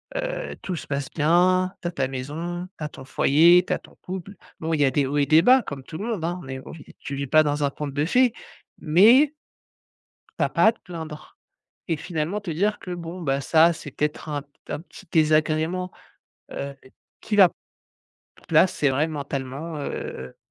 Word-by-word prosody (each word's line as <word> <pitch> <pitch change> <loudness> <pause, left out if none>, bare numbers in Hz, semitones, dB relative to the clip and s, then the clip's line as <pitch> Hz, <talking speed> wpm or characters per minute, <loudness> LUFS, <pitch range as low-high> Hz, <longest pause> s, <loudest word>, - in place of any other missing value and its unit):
heu, - - -3
tout 185 - -4
se - - -7
passe 140 -1 -3
bien, 180 +4 +3
tu 175 - -3
as - - -2
ta 135 -6 -1
maison, 165 +7 -5
tu - - -7
as 150 - -3
ton 135 - -12
foyer, 170 +7 +5
tu - - +1
as - - -2
ton - - -19
couple». 190 +1 -6 0.3
Bon, 160 0 -2
il 145 - -1
y - - +6
a 135 - +2
des 140 +1 +1
hauts 145 +2 -2
et 145 - +3
des 155 +3 +6
bas 255 +4 +5
comme 140 -2 -7
tout 155 - -8
le 205 - -5
monde, 200 -8 -3
hein. 175 +2 -2
Mais 130 0 -6
on - - -8
vit 160 - -11
tu 140 - -6
vis 140 - -3
pas 155 +4 +6
dans 145 0 -1
un 140 - +1
conte 145 -2 -5
de 145 - +1
fées, 245 +6 +3 0.5
mais 225 - +5 1.1
tu - - +3
as - - -2
pas 220 - +4
te 225 - -21
plaindre 160 -3 -9 0.5
et 165 - +1
finalement 170 +5 -3
te 200 - -6
dire: 200 +7 0
«Que 180 - -8
bon, 175 +1 -7
bah, 135 -2 0
ça, 160 +4 +5
c'est 145 -4 -9
peut-être 150 +1 -3
un 145 -2 -3
p 140 - -32 0.2
un - - -4
petit 190 +3 -15
désagrément, 160 +3 +2 0.6
heu, 140 0 -5 0.5
qui 210 - -2
va 190 -4 +8 1.0
là, 160 +4 +6
c'est 150 -5 0
vrai 145 +4 +1
mentalement, 140 +1 -5
heu» 65 - -6
160 Hz, 210 wpm, -24 LUFS, 145-180 Hz, 1.1 s, va